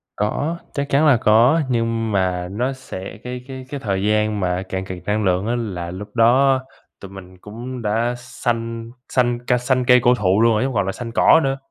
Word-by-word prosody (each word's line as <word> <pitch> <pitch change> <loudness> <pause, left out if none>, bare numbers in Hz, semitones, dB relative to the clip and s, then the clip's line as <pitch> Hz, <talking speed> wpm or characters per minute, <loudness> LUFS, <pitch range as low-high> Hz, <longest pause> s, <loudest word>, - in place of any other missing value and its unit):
Có, 145 +11 -1 0.2
chắc 140 -1 -3
chắn 140 +3 +3
là 130 - +6
có. 115 +9 +4
Nhưng 115 -2 -1
mà 90 -2 0
nó 125 +7 -1
sẽ 110 -7 -8
cái 125 0 -6
cái 130 -1 -8
cái 145 - -5
thời 100 -6 -2
gian 105 0 +1
mà 90 -1 -1
cạn 95 0 -3
kiệt 90 -2 -8
năng 105 +1 0
lượng 95 +1 +1
á 120 - 0
là 95 -8 -4
lúc 105 +4 -9
đó 130 +3 +4 0.4
tụi 100 -1 -10
mình 95 -1 -12
cũng 120 +4 -7
đã 115 +3 0
xanh 115 -1 -4 0.2
xanh 120 -1 0
ca 125 - +3
xanh 125 0 0
cây 125 0 +6
cổ 125 -1 +5
thụ 100 -1 +2
luôn 115 0 +4
rồi, 105 - +1
chứ - - 0
hông 135 - -4
còn 100 -2 +1
là 95 - -1
xanh 115 +3 -7
cỏ 160 - +5
nữa. 135 0 0
115 Hz, 220 wpm, -20 LUFS, 100-125 Hz, 0.4 s, là